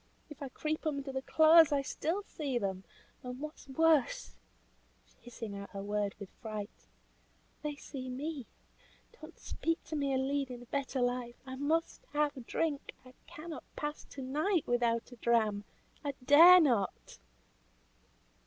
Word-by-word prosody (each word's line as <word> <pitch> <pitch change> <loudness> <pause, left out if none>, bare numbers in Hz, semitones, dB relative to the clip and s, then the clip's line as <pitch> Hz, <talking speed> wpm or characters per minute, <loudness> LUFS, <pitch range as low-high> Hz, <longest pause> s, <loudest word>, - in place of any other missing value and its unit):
If 300 - -11
I 275 - -4
creep 310 +4 -3
under 280 -2 -2
the 265 0 -2
clothes 320 +2 +7
I 280 -1 +2
still 330 +8 -2
see 280 -9 -3
them; 190 -3 -2 0.4
and 250 0 -7
what 305 +1 -5
is - - -16
worse," 295 - +2 0.9
hissing 225 -3 -7
out 200 0 -7
her 195 0 -5
words 205 0 -2
with 200 -2 -8
fright, 215 -1 -7 0.7
"they 300 -1 -3
see 265 -3 -7
me. 275 0 -4 0.7
Don't 310 +2 -11
speak 330 0 -2
to 315 - -6
me 280 -2 0
of 260 - +1
leading 265 -3 -2
a - - -14
better 270 0 -2
life 245 -1 -1
I 260 0 -6
must 315 - -1
have 290 -5 0
drink. 305 -4 -2
I 255 - -14
cannot 310 -1 -8
pass 295 0 -4
to 270 - -8
night 305 +7 +1
without 240 0 +1
a 245 - -11
dram; 215 -3 +1 0.4
I 285 -2 -3
dare 335 +6 +10
not." 240 - 0
270 Hz, 155 wpm, -33 LUFS, 240-305 Hz, 0.9 s, dare